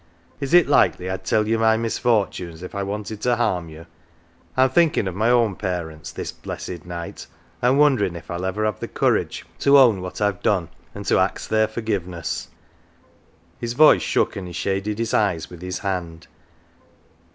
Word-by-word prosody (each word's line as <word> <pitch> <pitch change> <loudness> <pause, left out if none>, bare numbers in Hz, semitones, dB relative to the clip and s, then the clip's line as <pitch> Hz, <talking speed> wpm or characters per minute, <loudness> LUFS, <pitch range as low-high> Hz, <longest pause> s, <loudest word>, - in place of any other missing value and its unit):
" - - -33
Is 140 +4 +1
it 175 - +6
likely 95 -9 +2
I'd 95 0 -5
tell 105 +2 +2
you 115 +1 +1
my 110 0 +4
misfortunes 105 -7 -1
if 90 - -8
I 100 - -3
wanted 105 +2 -5
to 125 -1 +2
harm 90 -8 -1
you? 80 +1 -11 0.7
I'm 130 0 +4
thinkin' 160 - +3
of 95 - -3
my 110 +5 +1
own 115 -5 +3
parents 85 -5 -4
this - - -5
blessed 85 -3 -7
night, 85 -1 -7 0.3
an' 125 +3 +3
wonderin' 130 - +3
if 85 - -9
I'll 85 +1 -4
ever 105 +3 -1
have 105 -3 -1
the - - -4
courage - - 0
to 140 0 +6
own 115 -8 +5
what 90 0 -6
I've 100 -3 0
done, 90 -5 +1 0.3
and - - -7
to - - +3
ax - - 0
their 110 0 +2
forgiveness." 100 -7 -3 1.1
His 120 0 -3
voice 150 +4 +6
shook, - - 0
and 95 -2 -5
he 90 - -8
shaded 100 +4 -2
his 115 0 -2
eyes 90 -7 +1
with 90 -1 -11
his 90 0 -4
hand. 90 -4 -4
100 Hz, 185 wpm, -22 LUFS, 90-115 Hz, 1.1 s, it